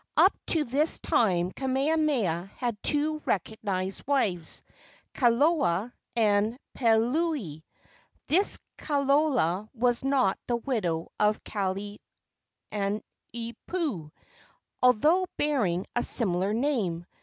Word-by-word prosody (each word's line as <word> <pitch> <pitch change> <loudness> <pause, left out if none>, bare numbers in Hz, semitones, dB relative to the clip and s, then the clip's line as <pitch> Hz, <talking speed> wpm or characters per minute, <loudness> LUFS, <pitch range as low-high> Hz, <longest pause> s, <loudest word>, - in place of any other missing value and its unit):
Up 385 - +6
to 320 -3 +2
this 290 +5 +1
time 180 -5 +2
Kamehameha 265 - 0
had 235 -5 -3
two 305 +1 0
recognized 195 -1 -2
wives, 200 - 0 0.5
Kalola 245 - +2 0.2
and 215 0 +2 0.2
Peleuli. 235 - +1 0.6
This 380 +7 +2 0.2
Kalola 275 - +1
was 245 +1 +1
not 270 -8 +2
the 240 - +1
widow 195 -11 -2
of 210 0 +2
Kalaniopuu, 200 0 -3 2.8
although 300 +10 +4
bearing 210 -12 +1
a 240 - +2
similar 190 -5 0
name. 215 - 0
235 Hz, 85 wpm, -28 LUFS, 195-280 Hz, 2.8 s, Up